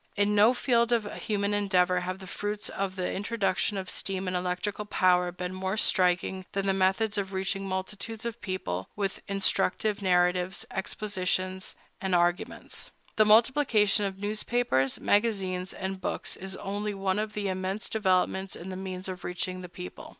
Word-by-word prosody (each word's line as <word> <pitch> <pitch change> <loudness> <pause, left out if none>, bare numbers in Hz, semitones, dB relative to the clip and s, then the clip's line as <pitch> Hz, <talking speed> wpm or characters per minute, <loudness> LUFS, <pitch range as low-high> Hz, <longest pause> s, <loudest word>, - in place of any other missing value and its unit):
In 205 0 +2
no 215 +4 +6
field 235 -2 +2
of 230 -3 +2
human 205 -1 -1
endeavor 185 -3 +3
have 185 +1 -3
the 190 - -10
fruits 205 +3 -4
of 195 -1 -3
the 185 -1 -2
introduction 200 -1 0
of 190 -1 -4
steam 190 0 -3
and 185 - -1
electrical 180 +4 -2
power 180 -3 +3
been 180 +1 -5
more 190 +2 -2
striking 185 -1 +2
than 195 - +1
in - - -5
the 195 - +3
methods 195 +3 +2
of 195 0 -4
reaching 195 +1 -1
multitudes 210 +4 -4
of 235 -2 -4
people 95 - -3
with 200 -2 -2
instructive 200 +1 +2
narratives, 180 0 +2
expositions, 185 -2 -2 0.3
and 190 -2 +1
arguments. 175 +1 -1 0.3
The 215 - +6
multiplication 220 -2 +4
of 195 -1 -2
newspapers, 205 - 0
magazines, 190 -4 +1
and 190 0 -4
books - - -2
is 190 +1 -6
only 205 +1 -3
one 195 0 0
of 215 0 -2
the 205 -1 -2
immense 190 +2 -2
developments 190 -2 +1
in 180 - -8
the 185 - -5
means 185 0 -5
of 185 -1 -6
reaching 185 +1 -3
the 180 - -8
people. 90 - -9
190 Hz, 165 wpm, -28 LUFS, 185-205 Hz, 0.3 s, no